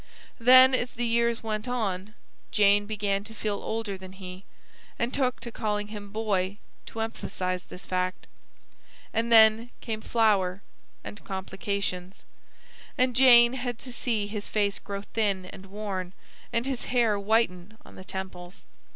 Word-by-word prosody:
Then, 255 +2 +8
as 245 -1 0
the 240 0 -2
years 235 0 +1
went 215 0 -3
on, 210 -4 -2 0.3
Jane 205 0 +4
began 205 -2 -1
to 225 +1 -12
feel 205 -1 -3
older 220 -4 -3
than 185 0 -10
he, 185 0 -10 0.5
and 235 +2 -1
took 255 -3 0
to 235 - -7
calling 210 -2 -2
him 205 -1 -8
"Boy" 200 -3 -1 0.3
to 225 - -5
emphasise 185 -5 -3
this 180 - -11
fact. 185 0 -2 0.9
And 230 +1 0
then 220 +1 +6
came 220 -3 -4
Flower; 200 -5 +2 0.4
and 205 - -8
complications. 190 -1 -4 0.7
And 255 -1 +2
Jane 240 -2 +7
had 245 -2 -3
to 250 0 -7
see 225 -4 -1
his 205 0 -5
face 205 -2 0
grow 200 0 -6
thin 200 -4 -1
and 195 +1 -11
worn, 190 -2 -5 0.4
and 230 +1 0
his 265 -2 -3
hair 230 -5 +2
whiten 205 -1 0
on - - -14
the 185 - -10
temples. 185 -1 -8
210 Hz, 150 wpm, -27 LUFS, 195-230 Hz, 0.9 s, Then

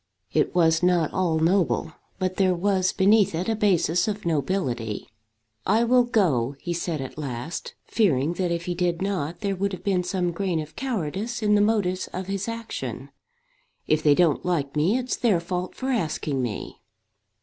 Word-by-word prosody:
It - - +1
was 165 -2 +4
not 175 -3 +2
all 175 -4 +1
noble; 165 -1 +1 0.2
but 185 0 -2
there 185 -2 +3
was 185 +1 +1
beneath 200 -2 +4
it 175 +3 -2
a 225 - +1
basis 180 -4 +2
of 210 -2 -3
nobility. 135 - -1 0.6
"I 225 +2 +3
will 245 +1 +4
go," 145 - +1
he 175 - -3
said 170 -3 -2
at 135 +3 -7
last, 135 +2 -5
fearing 160 - +2
that 180 0 -1
if 170 0 -2
he 180 - -1
did 175 0 -1
not, 175 -4 -2
there 200 -2 -1
would 200 +1 -1
have 185 - -7
been 190 -3 +1
some 180 -1 -1
grain 175 -1 -1
of 155 0 -7
cowardice 225 - -3
in 210 0 +3
the 205 - +5
motives 205 -4 +1
of 185 +1 -4
his 195 +1 -3
action. 230 0 -5 0.7
"If 155 0 +2
they 150 -2 +5
don't 170 -3 +3
like 155 -6 -1
me 170 +10 +2
it's 255 0 -2
their 215 -8 +2
fault 180 +1 -4
for 265 - -3
asking 155 - -1
me." 120 -4 -5
180 Hz, 180 wpm, -25 LUFS, 160-200 Hz, 0.7 s, the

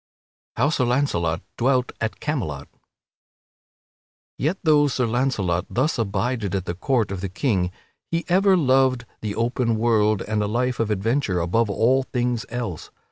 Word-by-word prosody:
[Sidenote: 115 - 0
How 145 - +4
Sir 130 -5 +1
Launcelot 105 - 0 0.2
dwelt 125 0 +2
at 110 -1 -2
Camelot] 80 - -3 1.7
Yet, 160 +8 0
though 150 -3 +5
Sir 125 -2 0
Launcelot 110 -8 0
thus 130 +2 0
abided 105 -1 -1
at 95 -2 -2
the 85 - -2
court 115 +2 0
of 95 -2 -4
the 100 - -3
King, 95 -3 0 0.4
he 165 0 -1
ever 190 +1 +4
loved 130 -4 +3 0.2
the 105 -1 -3
open 115 0 0
world 110 -3 +2
and 105 0 -1
a 105 - 0
life 125 +3 -1
of 115 -2 0
adventure 105 -1 0
above 105 +7 +1
all 120 +6 +3
things 125 -2 -2
else. 115 -9 -5
115 Hz, 155 wpm, -23 LUFS, 100-130 Hz, 1.7 s, though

